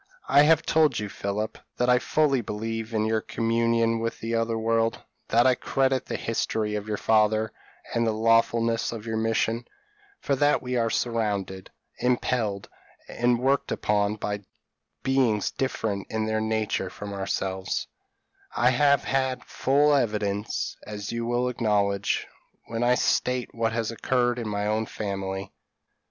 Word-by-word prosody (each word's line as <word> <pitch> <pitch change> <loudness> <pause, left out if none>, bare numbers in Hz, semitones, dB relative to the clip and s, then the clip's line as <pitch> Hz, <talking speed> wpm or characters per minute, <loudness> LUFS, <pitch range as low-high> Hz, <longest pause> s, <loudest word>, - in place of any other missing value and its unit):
I 140 +2 +6
have 160 +2 +5
told 155 -1 +3
you, 105 -1 -3
Philip, 105 +3 -3 0.2
that 125 - +1
I 125 0 +5
fully 140 -2 +2
believe 110 +1 -4
in 110 -1 0
your 110 0 +1
communion 115 0 +1
with 115 0 -3
the 115 +1 -3
other 115 0 0
world 115 0 +1 0.3
that 120 +2 +4
I 130 - +6
credit 130 +1 0
the - - -3
history 110 -1 -1
of 105 0 -3
your 105 -1 -2
father, 110 0 +2 0.4
and 115 0 +1
the - - +2
lawfulness 115 +1 +2
of 115 -2 -7
your 110 -1 -2
mission; 115 +1 0 0.6
for 140 - 0
that 145 +1 +3
we 125 0 -4
are 115 -2 +2
surrounded, 105 -6 -2 0.3
impelled, 120 -5 0 0.4
and 120 0 +1
worked 135 +3 +1
upon 105 0 +1
by 105 -1 -3 0.6
beings 125 -6 +2
different 110 -6 -2
in 110 -1 -1
their 110 0 0
nature 110 -3 -1
from 100 +2 -7
ourselves, 95 -1 -2 0.7
I 125 +1 +4
have 140 +2 +3
had 130 -2 -1
full 145 +3 +2
evidence, 105 -5 -1
as 105 -1 -5
you 115 0 -3
will 120 +1 +1
acknowledge, 105 -4 0 0.4
when 115 0 -4
I 120 +1 +4
state 125 0 0
what 115 -1 0
has 115 0 -1
occurred 120 +1 0
in 115 - -4
my 105 -1 -2
own 110 +1 0
family. 95 -2 -4
115 Hz, 150 wpm, -26 LUFS, 105-125 Hz, 0.7 s, I